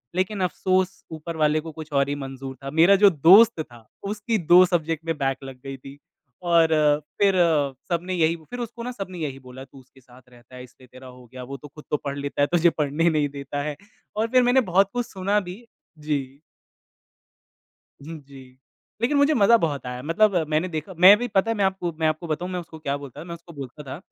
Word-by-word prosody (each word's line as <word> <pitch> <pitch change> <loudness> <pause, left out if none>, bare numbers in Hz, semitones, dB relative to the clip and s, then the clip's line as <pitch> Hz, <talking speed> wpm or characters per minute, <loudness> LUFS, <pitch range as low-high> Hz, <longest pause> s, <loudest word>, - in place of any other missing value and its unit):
लेक़िन 190 +3 -1
अफ़सोस 185 +1 -1
ऊपर 160 +1 -7
वाले 155 0 +2
को 160 +1 -8
कुछ 155 0 -10
और 140 0 +2
ही 145 - -1
मंज़ूर 135 -1 -7
था। 135 - -5
मेरा 165 +6 +5
जो 200 +1 +7
दोस्त 190 +6 +6
था 120 -6 -13 0.2
उसकी 215 +2 -2
2 175 +1 +6
सब्जेक्ट 165 -2 -2
में 165 -1 -2
बैक 135 -1 -1
लग 135 -1 -9
गई 135 0 -6
थी। 135 +2 -13 0.5
और 170 -1 +4 0.5
फ़िर 200 -1 +4 0.6
सबने 175 +2 -2
यही 165 -1 +2
फ़िर 165 +10 -10
उसको 235 0 -7
ना 250 - -4
सबने 190 -6 -7
यही 140 -4 -4
बोला 130 0 -11
तू 135 0 -17
उसके 130 +1 -21
साथ 125 0 -19
रहता 125 +1 -18
है 125 - -9
इसलिए 125 0 -17
तेरा 130 0 -12
हो 125 0 -14
गया 130 - -8
वो 135 +2 -8
तो 145 - -12
ख़ुद 150 - -14
तो 150 - +2
पढ़ 140 0 -3
लेता 140 0 -3
है 145 - +4
तुझे 170 0 +5
पढ़ने 150 +3 +1
नहीं 150 -3 0
देता 140 0 -6
है। 150 0 -4 0.4
और 220 +1 +1
फ़िर 255 +2 +3
मैंने 245 +2 +4
बहुत 195 +2 +4
कुछ 245 -1 -2
सुना 200 +2 0
भी, 190 +5 -10 0.3
जी। 140 -2 -4 1.6
हुँ 160 +2 -8
जी, 135 -1 -13 0.6
लेक़िन 255 +5 +1
मुझे 285 +2 +4
मज़ा 230 -2 +5
बहुत 150 - -2
आया। 125 0 -6
मतलब 200 +6 +2
मैंने 155 +3 0
देखा 160 +3 -5
मैं 190 +3 +9
भी 245 +2 -3
पता 205 0 +1
है - - -1
मैं 200 - +2
आपको 190 -2 -2
मैं 160 - +2
आपको 155 +2 -2
बताऊँ 170 +3 -3
मैं 180 - -3
उसको 165 -2 -11
क्या 140 -2 -2
बोलता 140 -3 -11
था - - -7
मैं 170 -1 -7
उसको 170 0 -15
बोलता 140 0 -9
था 135 0 -7
160 Hz, 220 wpm, -23 LUFS, 140-190 Hz, 1.6 s, मैं